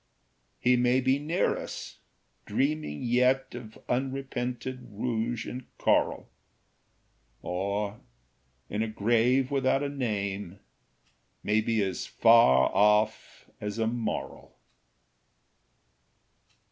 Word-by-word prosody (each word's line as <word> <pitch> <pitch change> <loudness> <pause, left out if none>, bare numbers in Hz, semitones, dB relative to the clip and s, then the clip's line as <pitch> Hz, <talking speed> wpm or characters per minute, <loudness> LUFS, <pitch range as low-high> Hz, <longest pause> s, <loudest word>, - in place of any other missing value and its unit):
He 125 0 +4
may 125 +1 +3
be 130 +1 +2
near 160 +5 0
us, - - -7 0.5
dreaming 135 - -1
yet 125 +2 +2
Of 115 -3 -9
unrepented 130 -1 -3
rouge 115 +2 -2
and 125 0 -7
coral; - - +1 1.2
Or 100 +3 -2 0.7
in 105 - -3
a 115 - 0
grave 120 +5 +2
without 135 0 +1
a 140 - -1
name 100 -8 -3 0.8
May 105 +1 +2
be 110 -1 +1
as 95 -1 -3
far 115 - +5
off 105 +1 +2
as 105 +1 -4
a 115 - +1
moral. 115 0 -4
120 Hz, 95 wpm, -28 LUFS, 105-130 Hz, 1.2 s, far